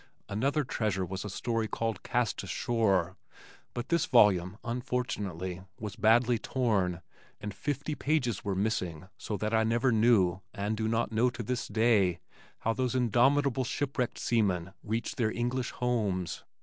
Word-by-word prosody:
Another 140 Hz, +9 st, 0 dB
treasure 105 Hz, -7 st, -1 dB
was 95 Hz, +2 st, -5 dB
a 105 Hz, -, -5 dB
story 115 Hz, +2 st, -1 dB
called 115 Hz, +1 st, -2 dB
Cast 125 Hz, -2 st, 0 dB
Ashore, 95 Hz, -2 st, 0 dB, 0.6 s
but 120 Hz, +2 st, -4 dB
this 170 Hz, 0 st, +2 dB
volume 100 Hz, -5 st, +4 dB
unfortunately 105 Hz, -7 st, -3 dB, 0.2 s
was 105 Hz, -2 st, -5 dB
badly 115 Hz, +2 st, +4 dB
torn 100 Hz, -10 st, 0 dB, 0.4 s
and 105 Hz, -1 st, -5 dB
fifty 145 Hz, +6 st, -3 dB
pages 135 Hz, -8 st, 0 dB
were 100 Hz, -2 st, -1 dB
missing 95 Hz, -4 st, -2 dB
so 105 Hz, -, -4 dB
that 110 Hz, +2 st, -2 dB
I 110 Hz, 0 st, +4 dB
never 115 Hz, +3 st, +2 dB
knew, 105 Hz, -5 st, +4 dB
and 105 Hz, +2 st, -1 dB
do 110 Hz, 0 st, -1 dB
not 115 Hz, +1 st, 0 dB
know 115 Hz, +3 st, +3 dB
to 120 Hz, -1 st, -6 dB
this 125 Hz, +3 st, -2 dB
day, 110 Hz, -6 st, +3 dB, 0.4 s
how 115 Hz, -, +1 dB
those 130 Hz, +1 st, -1 dB
indomitable 130 Hz, +2 st, +3 dB
shipwrecked 130 Hz, -1 st, -2 dB
seamen 95 Hz, -6 st, 0 dB
reached 110 Hz, +2 st, -3 dB
their 115 Hz, -4 st, +2 dB
English 120 Hz, +2 st, -1 dB
homes. 105 Hz, -8 st, -1 dB
115 Hz, 150 wpm, -30 LUFS, 100-125 Hz, 0.6 s, volume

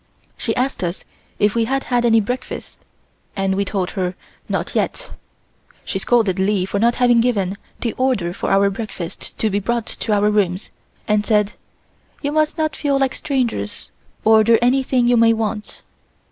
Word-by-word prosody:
She -, -, -2 dB
asked 255 Hz, -5 st, -1 dB
us 175 Hz, +1 st, -3 dB, 0.3 s
if 210 Hz, 0 st, +2 dB
we 230 Hz, -1 st, +1 dB
had 270 Hz, +3 st, -1 dB
had 245 Hz, -1 st, +1 dB
any 225 Hz, -1 st, +5 dB
breakfast 245 Hz, +5 st, -5 dB, 0.6 s
and 195 Hz, -1 st, 0 dB
we 200 Hz, +1 st, +1 dB
told 190 Hz, -2 st, -2 dB
her 185 Hz, -2 st, -2 dB, 0.3 s
not -, -, -2 dB
yet. -, -, -2 dB, 0.7 s
She -, -, -2 dB
scolded 215 Hz, -6 st, +2 dB
Li 190 Hz, -1 st, +1 dB
for 200 Hz, +1 st, -2 dB
not 235 Hz, +2 st, +3 dB
having 245 Hz, -2 st, +4 dB
given 200 Hz, -6 st, 0 dB, 0.3 s
the 230 Hz, -, -1 dB
order 235 Hz, -10 st, +1 dB
for -, -, -3 dB
our 200 Hz, 0 st, +4 dB
breakfast 195 Hz, -5 st, -6 dB
to 220 Hz, -, 0 dB
be 200 Hz, -, +1 dB
brought 235 Hz, +3 st, -1 dB
to 220 Hz, -, -4 dB
our 210 Hz, 0 st, +3 dB
rooms 195 Hz, -2 st, 0 dB, 0.4 s
and 210 Hz, -1 st, +2 dB
said: 210 Hz, -1 st, +2 dB, 0.7 s
"You 285 Hz, -, 0 dB
must 310 Hz, +1 st, +1 dB
not 310 Hz, -1 st, 0 dB
feel 280 Hz, -2 st, 0 dB
like 270 Hz, -1 st, +1 dB
strangers, 245 Hz, -, -2 dB, 0.3 s
order 220 Hz, +1 st, +6 dB
anything 255 Hz, 0 st, +2 dB
you 245 Hz, 0 st, +4 dB
may 230 Hz, 0 st, +5 dB
want." 215 Hz, -1 st, -4 dB
220 Hz, 170 wpm, -20 LUFS, 200-245 Hz, 0.7 s, order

